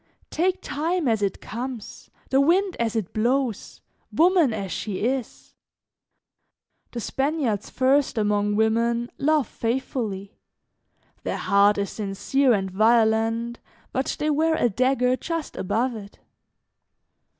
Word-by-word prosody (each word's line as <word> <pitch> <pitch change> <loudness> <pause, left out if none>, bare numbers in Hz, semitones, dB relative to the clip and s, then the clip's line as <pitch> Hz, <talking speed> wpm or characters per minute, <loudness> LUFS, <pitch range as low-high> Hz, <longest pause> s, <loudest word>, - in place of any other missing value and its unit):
"Take 365 +3 0
time 315 +2 -1
as 220 -3 +1
it 200 -2 -1
comes, 240 0 -7 0.2
the 270 +1 +4
wind 365 +6 +2
as 230 -1 -1
it 215 -5 -2
blows, 240 0 -1 0.3
woman 345 -5 +4
as 200 -4 -4
she 200 -3 -4
is. 260 -1 -3 1.4
The 240 - -5
Spaniards 265 -4 -1
first, 265 0 +2
among 205 -1 +1
women, 230 +2 +1
love 300 -4 +2
faithfully; 225 -5 -3 0.9
their - - -3
heart 200 +1 +3
is 200 -1 -2
sincere 225 +7 0
and 195 -4 0
violent, 225 +2 +2 0.3
but 265 0 -1
they 305 +1 0
wear 320 +2 +2
a 240 - +2
dagger 255 +3 +2
just 330 +3 -4
above 235 +7 -1
it. 200 -2 -10
235 Hz, 120 wpm, -24 LUFS, 215-275 Hz, 1.4 s, the